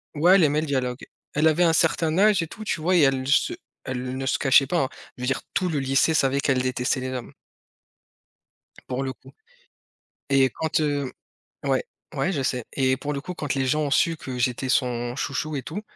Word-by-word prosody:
ouais 175 +6 +5
elle 190 - +5
aimait 150 0 +2
le 160 - -4
dialogue, 130 -2 -2 0.3
elle 150 +2 +3
avait 160 +3 +3
un 165 -1 +4
certain 160 -1 +2
âge 205 -3 +5
et - - -5
tout, 215 - -9
tu 210 - -2
vois? 180 +4 +2
Et 175 - +5
elle 135 -2 +2
se 140 - +3 0.3
elle 130 -1 -4
ne 135 - -3
se 135 - 0
cachait 135 0 +5
pas 175 - 0
hein, - - -6 0.3
je 125 - -7
veux - - -1
dire 135 - 0
tout 185 - +1
le 155 -5 -1
lycée 135 +4 +2
savait 140 -2 +2
qu'elle 135 -2 +1
détestait 130 +1 -1
les 130 - -3
hommes. 125 -2 -6 1.6
Pour 130 +1 -2
le 130 -1 -3
coup - - -18 1.0
et 135 -1 +4
quand, 160 0 -1
heu 145 -3 -1 0.5
ouais, - - +1 0.3
ouais, 190 - 0
je 145 -7 -2
sais. 125 -3 -1
Et 130 -1 +1
pour 145 +2 -4
le 140 - -4
coup, 180 - -6
quand 150 -5 -3
les 135 -1 0
gens 150 +4 +1
ont 145 - -2
su 165 +3 +3
que 130 -3 -6
j'étais 125 +1 -1
son 120 -2 0
chouchou 145 +2 -3
et 135 - -3
tout, 205 - -5
140 Hz, 220 wpm, -24 LUFS, 130-155 Hz, 1.6 s, ouais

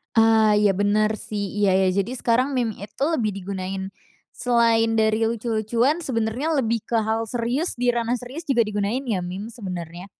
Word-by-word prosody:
Eee, 220 -2 +5
iya 200 - +5
bener 205 +2 +2
sih, 205 -3 -4
iya 200 -2 +3
iya, 190 0 +3
jadi 200 +5 -2
sekarang 255 +3 +1
meme 230 -4 -1
itu 210 +7 -5
lebih 250 -10 +1
digunain 190 0 -5 0.4
selain 230 -2 +2
dari 220 0 +2
lucu-lucuan, 230 +5 0
sebenernya 255 +2 -1
lebih 230 -1 0
ke 235 - -2
hal 220 +1 -1
serius, 245 - -1
di 245 -1 +1
ranah 235 0 0
serius 255 +7 -8
juga 260 -4 +3
digunain 210 +4 -2
ya 225 -7 -1
meme 195 +5 -6
sebenernya. 180 -5 -7
225 Hz, 165 wpm, -23 LUFS, 205-240 Hz, 0.4 s, Eee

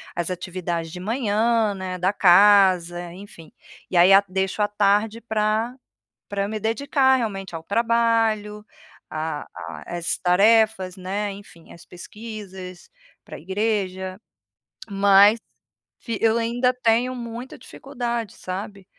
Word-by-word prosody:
as 175 +1 -2
atividades 175 -2 -4
de 180 - -8
manhã, 220 0 0
né, 185 -1 -5
da 185 +2 +2
casa, 180 -3 +4
enfim. 180 -4 -13 0.4
E - - -5
aí 175 +2 +6
a 195 +1 +7
deixo 190 +2 -1
à 205 - +2
tarde 210 +2 +1
pra 220 +1 -1 0.5
pra 200 0 -2
me 215 - -4
dedicar 265 +4 +2
realmente 195 -7 -4
ao 160 - -6
trabalho, 225 -1 0 0.5
a 155 -1 -4
a 175 - -8
às 170 - -2
tarefas, 195 0 +3
né, 195 +3 -3
enfim, 195 -4 -14
às 170 - -15
pesquisas 190 -1 -10 0.3
pra - - -10
igreja. 190 -1 -2 0.7
Mas 200 +2 +5 0.6
fi 230 -3 -4
eu 225 0 +3
ainda 240 +2 +1
tenho 250 +1 +1
muita 235 +1 -8
dificuldade, 240 -5 -5
sabe. 195 +1 -7
205 Hz, 125 wpm, -23 LUFS, 185-225 Hz, 0.7 s, a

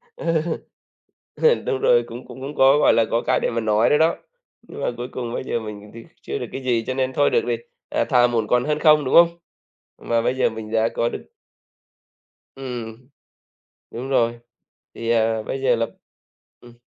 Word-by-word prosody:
Ừ. 165 -2 0 0.9
Ừ, 475 0 +4
đúng 425 -3 -3
rồi, 480 +1 +4
cũng 120 - -9
cũng 135 +3 -8
có, 135 +2 +5
gọi - - +5
là, 115 - +3
có 115 - +1
cái - - +2
để - - 0
mà 115 - -1
nói 110 +1 +2
nữa 150 - +4
đó, 160 +1 +3 0.5
nhưng - - -11
mà - - 0
cuối 120 +1 -5
cùng 120 -2 -5
bây - - -4
giờ 120 - -2
mình 105 -1 -9
thì 115 - -9 0.2
chưa - - -4
được - - -5
cái 135 - -6
gì 115 -3 +1
cho 130 - -2
nên 130 0 -1
thôi 145 +2 +2
được - - +3
thì, 120 - +1 0.3
à, - - +1
thà 125 -1 +4
muộn 115 -3 -1
còn 125 +2 +2
hơn 150 0 0
không, 150 -1 +5
đúng 130 - -1
không? 170 0 +8 0.7
Và 115 0 0
bây 125 - 0
giờ 130 - +2
mình 110 -1 -8
đã 115 0 +2
có 115 - -1
được - - -7 1.3
Ừm. 125 -1 -7 0.8
Đúng 130 +3 -6
rồi, 120 -3 +1 0.5
thì, 115 0 -5
à, 110 -1 +1
bây 135 - -4
giờ 125 -2 +3
là 115 0 0 0.7
ừm. 120 -1 -16
120 Hz, 205 wpm, -22 LUFS, 115-135 Hz, 1.3 s, không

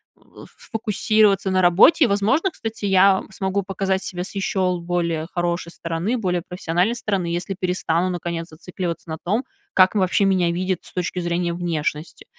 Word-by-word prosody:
в - - -16
сфокусироваться 215 -2 +1
на 185 0 +3
работе, 190 - +6
и, 255 - +5
возможно, 220 - +1
кстати, 225 -7 -7
я 195 0 +4
смогу 195 +1 -2
показать 190 0 -1
себя 180 -1 -4
с 200 - -8
еще 185 -2 0
более 170 -2 -1
хорошей 175 -1 -2
стороны, 170 +10 -2
более 180 -5 -1
профессиональной 180 +5 0
стороны, 195 -6 -1
если 175 +3 -3
перестану, 180 -1 0
наконец, 170 -1 -4
зацикливаться 170 +1 -6
на 160 - -4
том, 220 +8 0 0.3
как 185 +2 +5
вообще 190 +1 +2
меня 185 -3 +2
видят 185 +1 -1
с - - -6
точки 180 0 -2
зрения 175 0 -1
внешности. 165 -3 -3
185 Hz, 160 wpm, -22 LUFS, 170-195 Hz, 0.3 s, работе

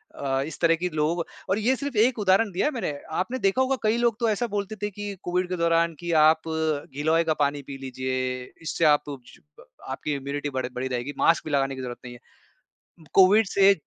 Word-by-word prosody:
अ, 135 -1 -1
इस 160 - -9
तरह 165 -1 +4
कि 180 - 0
लोग 160 +2 0 0.3
और 195 - +2
ये 250 +5 +2
सिर्फ 280 -2 -5
एक 230 +2 +3
उदाहरण 195 +1 +3
दिया 180 - 0
है 300 - +2
मैंने, 225 - -2 0.2
आपने 240 +10 -2
देखा 195 +5 +2
होगा 265 +1 +2
कई 215 +2 +2
लोग 235 -2 +2
तो 230 -2 +2
ऐसा 225 +3 0
बोलते 205 0 -3
थे 205 - -1
कि 205 0 -6
कोविड 180 0 -1
के 180 - -1
दौरान 170 0 +2
कि 175 -1 -4
आप 155 +1 +5
गिलोए 160 0 0
का 160 -1 +1
पानी 145 0 +1
पी 135 0 -8
लीजिए, 130 -1 -3 0.2
इससे 165 0 -1
आप 150 -1 +5
सु 140 - -5 0.7
आपकी 150 - -3
इम्यूनिटी 140 +1 -4
बढ़ 130 -2 -2
बढ़ी 130 +1 -2
रहेगी, 125 +3 -3
मास्क 165 - +3
भी 155 - -5
लगाने 135 -1 +1
की 130 - -6
जरूरत 120 -1 -6
नहीं 120 - -8
है। 120 - -13 0.9
कोविड 200 +3 +6
से 195 +1 +5
165 Hz, 215 wpm, -25 LUFS, 140-205 Hz, 0.9 s, कोविड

